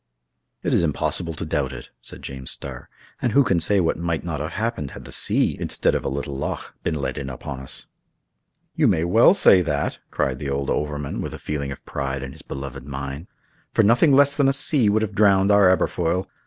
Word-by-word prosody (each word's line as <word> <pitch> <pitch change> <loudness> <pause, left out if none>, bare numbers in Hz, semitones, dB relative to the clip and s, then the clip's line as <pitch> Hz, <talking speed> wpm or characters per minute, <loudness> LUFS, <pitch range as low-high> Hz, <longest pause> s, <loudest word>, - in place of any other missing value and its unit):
"It - - 0
is - - +3
impossible 80 +1 -1
to 80 - -5
doubt 70 -4 -1
it," 65 - -10
said - - -9
James 65 -1 -7
Starr; 65 -3 -4 0.3
"and 120 - 0
who 140 - +6
can 95 -9 +1
say 100 +5 +5
what 80 -3 0
might 85 -2 -2
not 80 -4 -4
have 80 +3 -4
happened 110 - -2
had - - -11
the - - -10
sea, - - +2
instead - - +1
of - - -1
a - - -1
little 70 0 -4
loch, 70 - -4
been 80 - -2
let 70 - -3
in 70 - -5
upon 65 0 -7
us?" 65 - -7 0.9
"You - - +2
may 80 - +2
well 110 - +5
say 95 - +6
that," 75 -4 -2
cried 65 -1 -1
the 70 - -4
old 70 0 -2
overman, 75 -1 -3
with - - -5
a - - -8
feeling 70 -2 -4
of 70 - -9
pride 70 -1 -4
in 65 - -6
his 75 +2 -10
beloved 70 -1 -7
mine; 70 +3 -6 0.5
"for - - +4
nothing 120 +8 +4
less 140 +1 +5
than 140 -2 +3
a 135 - +3
sea 135 -4 +3
would 110 +2 +2
have 105 -1 -3
drowned 100 -1 +4
our 100 -2 +6
Aberfoyle. 90 0 0
80 Hz, 220 wpm, -23 LUFS, 70-100 Hz, 0.9 s, who